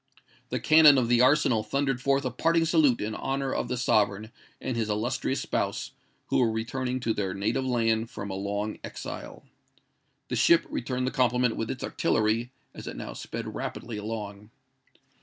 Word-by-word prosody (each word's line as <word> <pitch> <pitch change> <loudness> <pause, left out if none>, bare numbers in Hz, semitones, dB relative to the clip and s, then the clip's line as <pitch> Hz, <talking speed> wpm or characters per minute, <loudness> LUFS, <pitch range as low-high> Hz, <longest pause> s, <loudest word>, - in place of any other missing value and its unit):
The - - -2
cannon 155 -2 +7
of 120 -3 +1
the 120 0 +4
arsenal 130 -4 +4
thundered 135 +3 -1
forth 140 0 +1
a 130 - -1
parting 165 +6 +2
salute 155 -6 +3
in 105 +1 -2
honour 135 +3 -2
of - - -2
the 125 - -2
sovereign 110 -3 +1 0.3
and 130 - -3
his 115 -2 -1
illustrious 115 +5 -1
spouse - - -2 0.4
who - - +2
were 120 -3 +3
returning 125 +3 -2
to 115 -2 0
their 95 -3 -2
native 110 +7 -1
land 115 -2 +1
from 100 0 -6
a - - -3
long 100 +2 -3
exile. - - -7 0.9
The - - -1
ship 170 - +4
returned 125 +1 -2
the 130 - -1
compliment 125 -2 +2
with 115 - -3
its 130 - -4
artillery, 110 +2 0 0.2
as - - -9
it - - -6
now - - -6
sped - - -6
rapidly 115 -2 -5
along. 105 -1 -6
120 Hz, 175 wpm, -27 LUFS, 110-130 Hz, 0.9 s, cannon